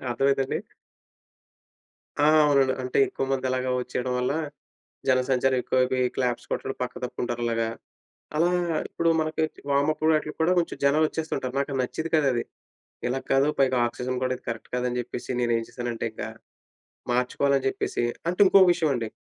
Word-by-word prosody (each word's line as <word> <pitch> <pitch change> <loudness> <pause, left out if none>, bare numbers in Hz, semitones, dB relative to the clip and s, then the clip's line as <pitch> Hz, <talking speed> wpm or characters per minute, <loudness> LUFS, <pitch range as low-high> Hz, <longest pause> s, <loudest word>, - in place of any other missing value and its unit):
అర్థమైందా 135 +2 +2
అండి? - - -2 1.7
ఆ! - - +6 0.2
అవునండి 135 -3 +3
అంటే 125 - -1
ఎక్కువమంది 135 -1 -2
అలాగా 130 0 -1
వచ్చేయడం 125 0 -3
వల్ల, 125 +2 0 0.8
జనసంచారం 130 0 +2
ఎక్కువైపోయి 130 0 +1
క్లాప్స్ 125 -2 -1
కొట్టడం 135 - -2
పక్క 125 - -2
తప్పుకుంటారు 120 -1 -3
అలాగా. 115 -1 0 0.7
అలా 175 +2 +3 0.4
ఇప్పుడు 165 0 0
మనకి 155 0 -1 0.3
వార్మ్ 140 +2 +3
అప్ 155 - -10
వాటిల్లకి 155 -1 0
కూడా 170 +3 +3
కొంచెం 170 - -3
జనాలొచ్చేస్తుంటారు 150 -3 0
నాకు 140 -1 -2
నచ్చేది 160 +6 -4
కాదది. 135 -6 +2 0.7
ఇలా 130 +2 -1
కాదు 135 +2 +4
పైగా 130 -1 +3
ఆక్సిజన్ 125 +1 -4
కూడా 130 0 0
ఇది - - -31
కరెక్ట్ 115 -1 -7
కాదని 125 0 -1
జెప్పేసి 120 +1 -5
నేనేం 115 -1 +1
చేశానంటే 120 -1 -4
ఇకా 110 - -5 0.8
మార్చుకోవాలని 135 +2 +1
చెప్పేసి 130 - -2 0.3
అంటే 180 +3 -2
ఇంకోక 190 0 +7
విషయమండి 145 -10 0
130 Hz, 140 wpm, -26 LUFS, 125-140 Hz, 1.7 s, ఇంకోక